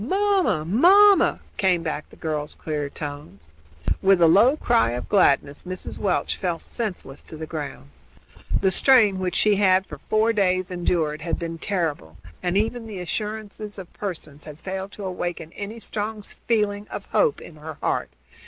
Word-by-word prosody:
"Mamma! 380 Hz, -, +1 dB
mamma!" 380 Hz, -, +6 dB, 0.2 s
came 180 Hz, -3 st, +2 dB
back 155 Hz, -1 st, -3 dB
in -, -, -35 dB
the -, -, -16 dB
girl's 150 Hz, -2 st, -4 dB
clear 150 Hz, -2 st, -3 dB
tones. 145 Hz, -, -8 dB, 0.5 s
With 190 Hz, -1 st, +5 dB
a 170 Hz, -, +6 dB
low 230 Hz, -, +5 dB
cry 115 Hz, -, +2 dB
of 125 Hz, -, -4 dB
gladness 145 Hz, -7 st, +3 dB
Mrs. 185 Hz, 0 st, -6 dB
Welch 195 Hz, -3 st, 0 dB
fell 175 Hz, -3 st, -1 dB
senseless 180 Hz, -, -5 dB
to 160 Hz, -, -10 dB
the 160 Hz, -, -5 dB
ground. 145 Hz, -, -7 dB, 0.7 s
The 190 Hz, -1 st, +3 dB
strain 215 Hz, -3 st, +5 dB
which 185 Hz, -1 st, -2 dB
she 210 Hz, -2 st, +3 dB
had 190 Hz, -1 st, +4 dB
for -, -, -10 dB
four 220 Hz, +1 st, +3 dB
days 185 Hz, -3 st, +1 dB
endured 165 Hz, -4 st, 0 dB
had 165 Hz, +1 st, -2 dB
been 165 Hz, -1 st, -5 dB
terrible, 160 Hz, -, -2 dB, 0.2 s
and 180 Hz, +2 st, 0 dB
even 225 Hz, +2 st, -1 dB
the 205 Hz, -4 st, -6 dB
assurances 210 Hz, +2 st, -5 dB
of 185 Hz, -3 st, -10 dB
Pearson 165 Hz, -7 st, -6 dB
had 150 Hz, 0 st, -10 dB
failed 190 Hz, +2 st, -5 dB
to 205 Hz, -, -7 dB
awaken 175 Hz, -3 st, -4 dB
any 210 Hz, +3 st, -6 dB
strong 215 Hz, -1 st, -4 dB, 0.2 s
feeling 210 Hz, -2 st, +1 dB
of -, -, -7 dB
hope 465 Hz, -3 st, +2 dB
in 160 Hz, -, -12 dB
her 155 Hz, +1 st, -8 dB
heart. -, -, -1 dB
185 Hz, 170 wpm, -24 LUFS, 160-210 Hz, 0.7 s, mamma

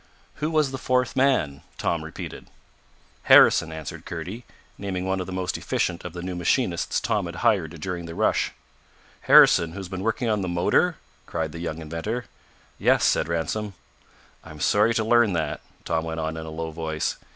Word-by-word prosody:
"Who 150 Hz, +2 st, -1 dB
was 155 Hz, -4 st, +2 dB
the 135 Hz, -, -5 dB
fourth 125 Hz, -1 st, 0 dB
man?" 130 Hz, -, +2 dB, 0.2 s
Tom -, -, -1 dB
repeated. -, -, -8 dB, 0.8 s
"Harrison," 80 Hz, -, +7 dB
answered 80 Hz, -2 st, -7 dB
Kurdy, 90 Hz, +8 st, -6 dB, 0.3 s
naming 95 Hz, -2 st, -4 dB
one 95 Hz, 0 st, 0 dB
of 90 Hz, -, -4 dB
the -, -, -6 dB
most 90 Hz, -1 st, -2 dB
efficient 85 Hz, -1 st, -1 dB
of 90 Hz, -, -7 dB
the 90 Hz, -1 st, -6 dB
new 90 Hz, 0 st, -4 dB
machinists 90 Hz, +1 st, 0 dB
Tom 100 Hz, -4 st, -1 dB
had 85 Hz, -, -7 dB
hired 85 Hz, -8 st, +2 dB
during 85 Hz, 0 st, -4 dB
the 85 Hz, -, -7 dB
rush. -, -, +1 dB, 0.7 s
"Harrison, 85 Hz, -1 st, +6 dB
who -, -, -9 dB
has 95 Hz, -2 st, -6 dB
been 95 Hz, -1 st, -5 dB
working 115 Hz, +4 st, -1 dB
on 105 Hz, -2 st, +1 dB
the 95 Hz, -, -2 dB
motor?" 90 Hz, -, +2 dB, 0.3 s
cried 80 Hz, -1 st, -3 dB
the 85 Hz, -, -8 dB
young 85 Hz, -2 st, -4 dB
inventor. 85 Hz, +10 st, -4 dB, 0.5 s
"Yes," -, -, +3 dB
said -, -, +2 dB
Ransom. 85 Hz, +5 st, -2 dB, 0.7 s
"I'm 75 Hz, -, -11 dB
sorry 105 Hz, +8 st, +3 dB
to 110 Hz, -, +1 dB
learn 120 Hz, -2 st, +4 dB
that," 80 Hz, -2 st, -2 dB, 0.2 s
Tom 80 Hz, -1 st, 0 dB
went 80 Hz, 0 st, -4 dB
on 80 Hz, 0 st, -2 dB
in 80 Hz, 0 st, -6 dB
a -, -, -5 dB
low 80 Hz, +1 st, -5 dB
voice. 80 Hz, -1 st, -3 dB
90 Hz, 185 wpm, -25 LUFS, 80-110 Hz, 0.8 s, Harrison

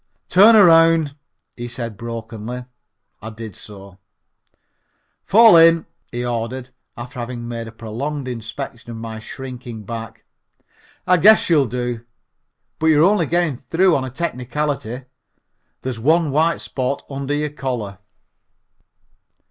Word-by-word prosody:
"Turn 210 Hz, +5 st, +7 dB
around," 165 Hz, -6 st, +5 dB, 0.4 s
he 120 Hz, 0 st, -6 dB
said 115 Hz, -2 st, -6 dB
brokenly. 115 Hz, +2 st, -7 dB, 0.6 s
I 110 Hz, -, -7 dB
did 110 Hz, -3 st, -9 dB
so. 100 Hz, -2 st, -12 dB, 1.2 s
"Fall 225 Hz, -1 st, +7 dB
in," 165 Hz, 0 st, +6 dB, 0.3 s
he 120 Hz, 0 st, -3 dB
ordered, 120 Hz, +2 st, -4 dB, 0.3 s
after 125 Hz, +2 st, -8 dB
having 120 Hz, 0 st, -5 dB
made 115 Hz, -1 st, -5 dB
a -, -, -9 dB
prolonged 130 Hz, +6 st, -5 dB
inspection 115 Hz, -1 st, -7 dB
of 115 Hz, -, -7 dB
my 110 Hz, -1 st, -7 dB
shrinking 125 Hz, -2 st, -8 dB
back. 115 Hz, +1 st, -8 dB, 0.8 s
"I 180 Hz, -, +4 dB
guess 210 Hz, +1 st, +5 dB
you'll 145 Hz, -5 st, +4 dB
do, 120 Hz, -1 st, -4 dB, 0.8 s
but 160 Hz, -, +1 dB
you 155 Hz, -2 st, +5 dB
are 190 Hz, -, +6 dB
only 200 Hz, -7 st, +1 dB
getting 170 Hz, -5 st, 0 dB
through 165 Hz, +7 st, +2 dB
on 135 Hz, -, 0 dB
a 130 Hz, -, -4 dB
technicality 135 Hz, -2 st, -3 dB, 0.8 s
there's 125 Hz, -3 st, -4 dB
one 160 Hz, +5 st, +2 dB
white 160 Hz, +4 st, +1 dB
spot 130 Hz, +1 st, -3 dB
under 140 Hz, +1 st, -3 dB
your 150 Hz, 0 st, -2 dB
collar." 120 Hz, -9 st, -4 dB
125 Hz, 130 wpm, -20 LUFS, 115-155 Hz, 1.2 s, Turn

